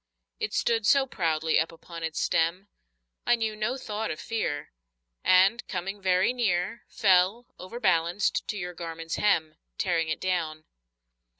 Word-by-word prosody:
It 445 -1 -2
stood 225 -3 +1
so 275 -1 +5
proudly 160 -8 +1
up 160 - 0
upon 165 0 -10
its 160 -1 -3
stem, 175 +5 0 0.6
I 240 - +6
knew 220 -2 -2
no 215 +5 -1
thought 220 -3 -4
of 155 - -4
fear, 145 -10 -3 0.5
And 190 +6 +5
coming 195 +2 -4
very 185 +4 +3
near 205 -2 -1
Fell, 195 +2 +3
overbalanced, 180 -3 0
to 210 - -3
your 180 -2 -5
garment's 165 -1 -5
hem, 160 -7 +1 0.2
Tearing 165 -4 0
it 155 - -2
down. 160 -4 -2
185 Hz, 140 wpm, -27 LUFS, 165-215 Hz, 0.6 s, I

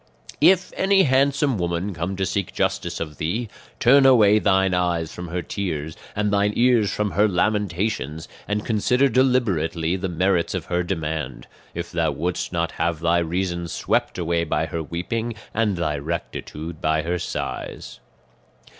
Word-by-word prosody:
"If 185 -1 +4
any 195 0 +4
handsome 135 - +2
woman 85 +3 -2
come 85 +3 -3
to 95 0 -1
seek 95 +1 -2
justice - - -1
of 75 -3 -5
thee, 105 +9 -2 0.3
turn 135 +3 +6
away 110 -6 +6
thine 95 -2 +2
eyes 85 -3 0
from 90 0 -7
her 85 +1 -3
tears 80 -6 -4 0.2
and 105 0 0
thine 100 +1 +2
ears 120 -4 +4
from 105 -1 -1
her 105 +2 +3
lamentations, 90 -5 -1 0.2
and 105 0 -2
consider 125 +5 +2
deliberately 95 -10 +1
the 95 0 -3
merits 90 0 +1
of - - -3
her 90 0 0
demand, 80 -7 -3 0.3
if - - -5
thou - - +1
wouldst 90 +2 -2
not 85 -1 -1
have 85 -3 -1
thy 85 +1 +2
reason 85 +1 -2
swept - - -1
away 85 -1 0
by 80 - 0
her 85 - -4
weeping, 110 +9 -3 0.2
and 105 -4 +1
thy 75 -4 -1
rectitude 80 +1 -5
by 80 0 +1
her 90 +1 -1
sighs. - - -5
90 Hz, 155 wpm, -23 LUFS, 85-105 Hz, 0.3 s, turn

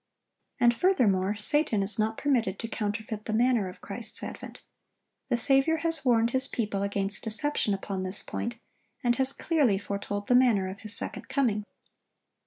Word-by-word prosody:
And, 240 0 +4
furthermore, 210 - +2
Satan 220 -1 +1
is 205 +3 -1
not 220 +1 0
permitted 235 -9 0
to 230 - -5
counterfeit 215 0 -4
the 220 - -3
manner 235 -4 +2
of 180 - -13
Christ's 215 +1 -2
advent. - - -8 0.6
The 245 - +1
Saviour 270 +6 +3
has 330 0 -1
warned 235 -2 +3
His 260 +1 +3
people 210 -4 -2
against 200 0 -1
deception 220 -2 +1
upon 195 -1 -5
this 185 +2 +1
point, 240 +1 -4 0.5
and 240 -1 +2
has 265 0 +3
clearly 280 - +1
foretold 200 0 -4
the 245 - +2
manner 240 -7 +4
of 195 +2 -8
His 215 0 -3
second - - -4
coming. 220 -7 0
225 Hz, 165 wpm, -28 LUFS, 205-255 Hz, 0.6 s, And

